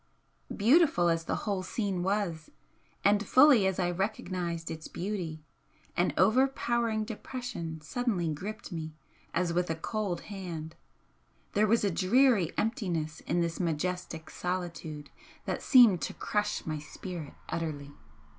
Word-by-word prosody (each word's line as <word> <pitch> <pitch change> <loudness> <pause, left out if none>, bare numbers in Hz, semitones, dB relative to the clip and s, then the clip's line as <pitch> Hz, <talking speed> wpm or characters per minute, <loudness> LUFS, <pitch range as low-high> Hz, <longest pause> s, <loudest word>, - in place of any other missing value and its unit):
Beautiful 235 - +5
as 165 0 0
the - - -1
whole 200 -3 0
scene 190 -1 -2
was, 180 -5 -1 0.5
and 205 +1 +4
fully 255 -2 +6
as 190 - -1
I 175 -2 +1
recognised 175 -3 -2
its 160 -1 -6
beauty, 175 -5 -4 0.5
an 175 - +2
overpowering 235 0 +2
depression 215 -7 -5
suddenly 190 +1 -1
gripped 190 +8 -5
me 160 -2 -5 0.4
as 170 0 0
with 180 0 0
a 165 - 0
cold 190 +1 -2
hand, 170 -6 -6 0.8
there 210 +1 +3
was 230 +2 +3
a 200 - +2
dreary 200 - +4
emptiness 175 - -1
in 175 - +1
this 170 -1 -2
majestic 170 -1 -2
solitude 170 -4 -4 0.3
that - - -2
seemed 235 - +7
to - - -3
crush 210 0 -1
my 155 -1 -2
spirit 165 +1 -7
utterly. 150 -4 -3
180 Hz, 130 wpm, -30 LUFS, 165-215 Hz, 0.8 s, seemed